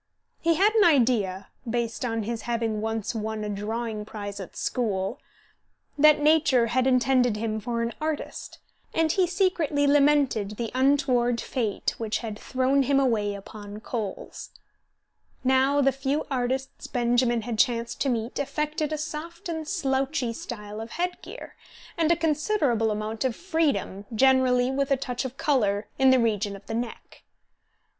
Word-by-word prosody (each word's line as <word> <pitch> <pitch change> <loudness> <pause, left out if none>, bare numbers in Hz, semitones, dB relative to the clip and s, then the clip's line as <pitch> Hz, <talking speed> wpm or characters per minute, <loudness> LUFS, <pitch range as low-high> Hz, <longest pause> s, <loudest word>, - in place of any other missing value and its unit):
He 335 0 +2
had 410 +6 +4
an 440 -2 +5
idea, 230 - +2 0.2
based 235 0 -2
on 225 -2 -1
his 230 +1 -3
having 225 -2 -1
once 220 0 -2
won 220 -1 -3
a 210 - -3
drawing 215 +2 -3
prize 205 -1 -7
at 190 - -9
school, 195 -6 -1 0.8
that 300 +1 +6
nature 295 -5 +4
had 255 +3 +1
intended 255 -3 +3
him 220 0 -2
for 235 +1 -2
an 230 0 -2
artist, 310 -1 -4 0.4
and 325 -1 +3
he 370 0 +2
secretly 345 -6 +1
lamented 280 -8 +3
the 235 -2 -3
untoward 255 -3 +2
fate 225 -6 -2
which 225 -2 -1
had 220 -3 -6
thrown 260 +2 +1
him 275 +1 +3
away 215 -6 +1
upon 205 +1 -9
coals. 215 -3 -5 0.9
Now 265 +2 +3
the 275 0 +4
few 270 +3 -2
artists 260 +1 -2
Benjamin 240 -1 +1
had 230 -2 -4
chanced 235 0 +1
to 275 - +2
meet 235 +1 -2
affected 300 +2 -2
a 310 - -1
soft 325 +3 -6
and 320 -2 -4
slouchy 270 - -1
style 210 -2 -7
of 225 0 -8
head 355 +1 -2
gear, - - -10 0.4
and 330 -1 +2
a - - +5
considerable 305 - +1
amount 215 +2 -3
of 255 -4 0
freedom, 295 - -1
generally 260 0 +4
with 275 +1 0
a 275 - +3
touch 255 -1 -3
of 260 +1 -6
colour, 215 -9 +1
in 265 0 +6
the 260 - +6
region 210 -4 0
of 195 - -13
the 225 - -5
neck. 235 0 -5
250 Hz, 155 wpm, -26 LUFS, 220-285 Hz, 0.9 s, that